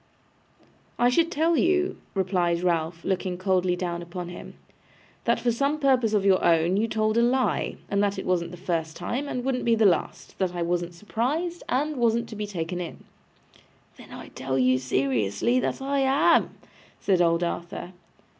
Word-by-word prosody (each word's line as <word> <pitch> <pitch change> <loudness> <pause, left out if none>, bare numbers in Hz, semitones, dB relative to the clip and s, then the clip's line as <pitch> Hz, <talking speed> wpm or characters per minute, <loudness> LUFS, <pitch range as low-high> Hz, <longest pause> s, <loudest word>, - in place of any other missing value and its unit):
'I 245 - +4
should 330 +7 +2
tell 330 +2 +2
you,' 365 +2 +2 0.2
replied 180 -3 +1
Ralph, 165 -1 -1
looking 185 -1 -1
coldly 185 -1 +1
down 175 -1 -3
upon 175 0 -6
him, 175 - -10 0.7
'that - - +2
for 240 - +1
some 280 +6 0
purpose 255 -7 +2
of 200 -1 +1
your 190 -1 +4
own 165 +2 +3
you 215 +3 +1
told 215 0 +1
a - - +4
lie, 255 +2 +1
and 200 0 0
that 200 -1 0
it - - -5
wasn't 175 -2 0
the 180 - -10
first 165 -3 -2
time 250 +11 -3
and 250 -3 -3
wouldn't 260 -2 -1
be 230 -1 +3
the 220 -1 +3
last; 185 -4 0
that 185 -2 -1
I 175 - -1
wasn't 175 0 -2
surprised 290 - -2
and 290 +4 0
wasn't 235 -1 +1
to 220 - -8
be 210 0 -4
taken 180 -2 -4
in.' 170 - -8 0.9
'Then - - -14
I - - -9
tell 130 0 -3
you 130 0 +3
seriously 130 - 0
that 265 - -2
I 280 +1 0
am,' 270 +2 +3 0.4
said 185 -3 +2
old 170 0 +2
Arthur. 175 +1 -4
190 Hz, 180 wpm, -26 LUFS, 170-245 Hz, 0.9 s, I